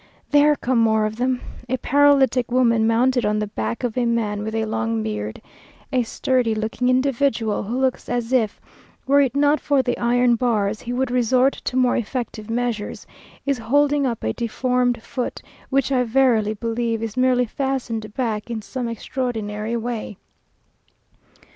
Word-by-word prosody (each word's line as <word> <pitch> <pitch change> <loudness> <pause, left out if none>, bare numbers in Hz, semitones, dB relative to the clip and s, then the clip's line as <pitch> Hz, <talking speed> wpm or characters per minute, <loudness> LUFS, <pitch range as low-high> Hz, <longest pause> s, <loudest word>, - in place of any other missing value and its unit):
There 295 +1 +5
come 255 -3 0
more 220 -1 +3
of 215 +1 -4
them! 250 +1 0 0.3
A 260 - 0
paralytic 265 -3 +3
woman 230 -3 +3
mounted 245 +2 +2
on 210 0 +1
the 210 - 0
back 110 - -4
of 240 -3 -2
a 245 -2 +1
man 215 -3 0
with 220 +1 -4
a 220 0 0
long 115 - -1
beard. 105 0 -4 0.5
A 255 - +3
sturdy 240 -1 0
looking 220 +3 -1
individual, 255 -4 +1
who 235 +5 -3
looks 260 -1 -1
as 245 0 -2
if, 225 -5 +1 0.5
were 280 +1 +5
it 270 -1 0
not 290 +1 +3
for 280 -2 +2
the 245 -1 0
iron 240 0 +3
bars, 215 -3 0
he 240 - -6
would 250 0 -1
resort 250 +2 +3
to - - -2
more 255 -1 +3
effective 230 -2 -4
measures, 230 -2 -3 0.4
is 280 -3 0
holding 285 +4 +2
up 235 -3 -4
a 110 - 0
deformed 245 0 0
foot, 250 - -4 0.3
which 275 0 +1
I 255 -2 +3
verily 230 -3 +2
believe 230 0 -2
is 225 -2 -4
merely 255 -1 +3
fastened 240 -4 -3
back 225 -4 -2
in 225 -2 -4
some 250 +2 -4
extraordinary 225 -2 -3
way. 230 -3 -4
240 Hz, 165 wpm, -22 LUFS, 220-255 Hz, 0.5 s, There